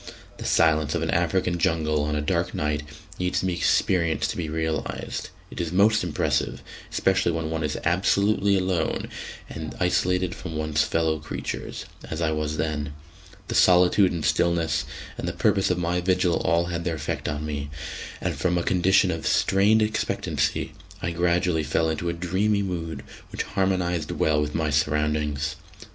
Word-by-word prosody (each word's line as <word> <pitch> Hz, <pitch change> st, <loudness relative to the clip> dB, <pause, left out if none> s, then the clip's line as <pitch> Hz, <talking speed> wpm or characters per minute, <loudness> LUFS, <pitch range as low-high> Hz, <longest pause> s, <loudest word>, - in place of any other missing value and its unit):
The -, -, -7 dB
silence 80 Hz, -2 st, +3 dB
of -, -, 0 dB
an -, -, 0 dB
African 90 Hz, -2 st, +1 dB
jungle 80 Hz, -2 st, +1 dB
on 75 Hz, 0 st, -1 dB
a 75 Hz, -, 0 dB
dark 75 Hz, -, 0 dB
night 75 Hz, 0 st, 0 dB, 0.4 s
needs 90 Hz, 0 st, 0 dB
to -, -, -2 dB
be 90 Hz, -, 0 dB
experienced 85 Hz, -1 st, +1 dB
to -, -, -6 dB
be 80 Hz, -3 st, -3 dB
realised; 80 Hz, 0 st, -3 dB, 0.2 s
it -, -, -4 dB
is 85 Hz, -2 st, -3 dB
most 105 Hz, +3 st, +4 dB
impressive, 85 Hz, -4 st, -1 dB, 0.3 s
especially 95 Hz, -2 st, +2 dB
when 80 Hz, -1 st, -3 dB
one 80 Hz, -1 st, -2 dB
is 75 Hz, -1 st, -1 dB
absolutely 100 Hz, +3 st, +3 dB
alone 90 Hz, -3 st, -1 dB, 0.4 s
and 80 Hz, -1 st, -6 dB
isolated 90 Hz, 0 st, +1 dB
from 80 Hz, -2 st, -7 dB
one's 75 Hz, -1 st, +1 dB
fellow 80 Hz, -1 st, +1 dB
creatures, 75 Hz, -, -5 dB, 0.2 s
as 80 Hz, -, -4 dB
I 80 Hz, -2 st, +1 dB
was 75 Hz, 0 st, -2 dB
then. 75 Hz, -2 st, -2 dB, 0.5 s
The -, -, -3 dB
solitude 90 Hz, +2 st, +5 dB
and 85 Hz, -3 st, -3 dB
stillness, 85 Hz, +2 st, +1 dB, 0.3 s
and -, -, -3 dB
the -, -, -2 dB
purpose 95 Hz, -, +2 dB
of 90 Hz, -, +1 dB
my 90 Hz, 0 st, 0 dB
vigil, 90 Hz, -2 st, +2 dB
all 85 Hz, +1 st, +2 dB
had 85 Hz, -1 st, -3 dB
their 85 Hz, -2 st, -1 dB
effect 75 Hz, -, -3 dB
on 75 Hz, +1 st, -3 dB
me, 75 Hz, -1 st, -4 dB, 0.5 s
and -, -, -2 dB
from 90 Hz, -1 st, 0 dB
a 85 Hz, -, 0 dB
condition 95 Hz, +1 st, +3 dB
of 80 Hz, -1 st, -3 dB
strained 105 Hz, +3 st, +4 dB
expectancy 110 Hz, +1 st, -1 dB, 0.3 s
I 90 Hz, -, 0 dB
gradually 85 Hz, 0 st, +1 dB
fell 80 Hz, +2 st, +1 dB
into 85 Hz, +2 st, -2 dB
a -, -, -1 dB
dreamy 95 Hz, +4 st, 0 dB
mood 85 Hz, -4 st, -4 dB, 0.3 s
which -, -, -2 dB
harmonised 90 Hz, -4 st, 0 dB
well 75 Hz, -1 st, +1 dB
with 75 Hz, 0 st, -2 dB
my 80 Hz, -2 st, 0 dB
surroundings. 75 Hz, 0 st, 0 dB
85 Hz, 170 wpm, -25 LUFS, 75-90 Hz, 0.5 s, solitude